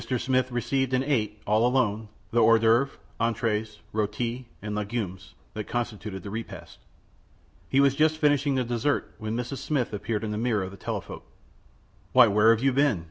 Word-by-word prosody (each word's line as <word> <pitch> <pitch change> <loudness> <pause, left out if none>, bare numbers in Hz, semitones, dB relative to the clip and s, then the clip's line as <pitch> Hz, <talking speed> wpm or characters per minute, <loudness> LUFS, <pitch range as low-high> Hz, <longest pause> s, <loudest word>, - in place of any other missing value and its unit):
Smith 130 0 0
received 130 +2 0
and 130 - +1
ate, 110 -7 -1
all 105 +2 +3
alone, 115 -4 +1 0.2
the 120 - +3
hors 115 +1 +6
d'oeuvre, 115 +5 +3 0.3
entr├®es, 110 -2 -1 0.2
r├┤ti, 115 +4 -2
and 105 0 -5
legumes 105 -3 -4 0.2
that 105 -1 -5
constituted 110 -5 -4
the 100 - -7
repast. 115 +2 -7 0.9
He 135 - +3
was 140 -1 +5
just 155 +2 +2
finishing 145 -2 +2
the 130 - +1
dessert 120 +4 -1
when 110 +1 -3
Mrs. 125 +2 -4
Smith 135 -8 -1
appeared 105 +1 -2
in 110 - -3
the 105 - -2
mirror 115 -4 +1
of 95 - -6
the 100 - -11
telephote. - - -4 0.9
"Why, 125 -1 +8
where 105 +1 +4
have 115 +1 +3
you 135 -1 +3
been?" 140 -7 +3
115 Hz, 175 wpm, -26 LUFS, 105-130 Hz, 0.9 s, Why